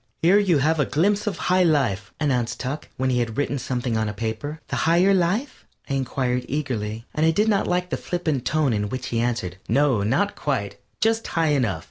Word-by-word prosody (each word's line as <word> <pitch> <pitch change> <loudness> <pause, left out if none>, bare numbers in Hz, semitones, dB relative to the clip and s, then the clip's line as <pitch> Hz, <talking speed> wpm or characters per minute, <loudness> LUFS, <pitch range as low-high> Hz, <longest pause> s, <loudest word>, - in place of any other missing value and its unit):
"Here 185 +5 +6
you 185 -6 +3
have 155 +3 +2
a 145 - +3
glimpse 205 +7 +1
of 205 - -1
High 185 +1 +2
Life," 130 - +1
announced 125 -5 0
Tuck, 135 +4 -4
when 130 0 +1
he 125 - +1
had 115 -2 -2
written 145 -1 0
something 125 -2 -2
on 110 -1 0
a 105 - -6
paper. 115 +8 -4
"The - - -2
Higher 180 +4 +5
Life?" 195 +9 -1 0.2
I - - -3
inquired, 130 -2 -1
eagerly, 115 -6 -3
and 155 - 0
I 160 - +5
did 205 +7 +2
not 205 -3 +2
like 180 0 -1
the - - 0
flippant 160 -7 -2
tone 150 -3 +1
in 105 -1 -1
which 130 +2 -4
he 115 - -1
answered: 115 -7 -2
"No, 140 -6 +3
not 140 - +1
quite 130 -9 -2 0.2
just 225 +1 +1
high 165 -2 +1
enough." 120 - +1
140 Hz, 210 wpm, -23 LUFS, 120-170 Hz, 0.2 s, Here